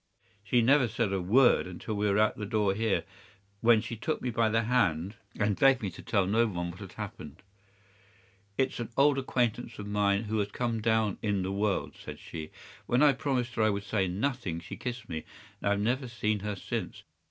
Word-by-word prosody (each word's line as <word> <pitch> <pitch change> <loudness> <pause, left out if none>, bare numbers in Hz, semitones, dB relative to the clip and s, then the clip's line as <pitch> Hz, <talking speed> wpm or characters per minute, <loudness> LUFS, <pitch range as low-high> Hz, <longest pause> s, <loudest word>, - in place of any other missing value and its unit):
She 120 +4 +2
never 135 +1 +5
said 105 -2 -1
a 95 - 0
word 120 +3 +4
until 90 +4 -6
we 105 0 +1
were 100 - +2
at 110 0 +3
the 105 - -5
door 105 -3 +1
here, 110 0 0 0.6
when 115 -1 +5
she 115 - -5
took 130 +8 -2
me 125 - -2
by 115 -1 +2
the 115 +1 +2
hand 100 -7 +1 0.3
and 105 -2 +1
begged 135 -4 +5
me 100 - -2
to 85 - -11
tell 100 -4 +1
no 115 +5 +3
one 85 -4 -3
what 85 - -13
had 95 -3 -9
happened. 100 -5 -8 1.1
"'"It's 130 -1 0
an 120 - -4
old 140 0 +5
acquaintance 120 -3 -1
of 105 - -6
mine 105 0 +1
who 110 0 -1
has 100 0 0
come 115 0 -2
down 110 -2 +1
in 100 -3 0
the 95 - -2
world," 100 0 -1
said - - -9
she. 80 -2 -8 0.4
When 125 +4 +3
I 145 -2 +6
promised 130 -3 -1
her 115 - -1
I 110 - +4
would 100 -1 -2
say 100 -2 0
nothing 105 -2 -2
she 85 - -8
kissed 125 -2 -5
me, 80 -2 -4 0.4
and - - -2
I - - +4
have 100 - -1
never 125 +5 0
seen 110 -3 -1
her 105 +1 -3
since. 95 - -5
110 Hz, 215 wpm, -29 LUFS, 100-120 Hz, 1.1 s, I